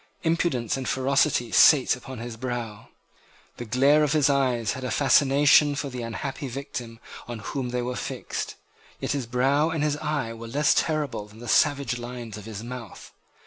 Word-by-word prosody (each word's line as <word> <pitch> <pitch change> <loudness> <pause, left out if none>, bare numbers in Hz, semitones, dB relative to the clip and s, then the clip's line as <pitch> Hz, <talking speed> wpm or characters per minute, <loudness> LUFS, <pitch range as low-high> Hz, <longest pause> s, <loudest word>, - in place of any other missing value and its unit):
Impudence 160 -8 0
and 130 - -4
ferocity 135 -2 +1
sate 140 +2 +6
upon 130 +1 -9
his 115 0 -6
brow. 120 -3 -5 0.7
The 120 - -6
glare 135 +6 +4
of 150 0 +1
his 150 -2 +3
eyes 125 -6 +1
had 130 - -6
a 125 - -2
fascination 145 +3 +4
for 140 0 -3
the 125 -1 -6
unhappy 135 +5 -5
victim 120 -3 -7 0.3
on 120 -1 -5
whom 125 +4 -4
they 125 0 -2
were 125 +1 -3
fixed. - - -5 0.4
Yet - - -2
his 140 -5 -2
brow 135 +6 +2
and 160 -2 -1
his 150 -1 0
eye 150 -7 -2
were 115 0 -9
less 145 +5 +2
terrible 150 -9 -1
than 105 +1 -17
the 120 +1 -10
savage 140 -2 +2
lines 120 -3 -7
of 105 -1 -9
his 110 -1 -7
mouth. 120 -3 -9
125 Hz, 180 wpm, -25 LUFS, 120-145 Hz, 0.7 s, sate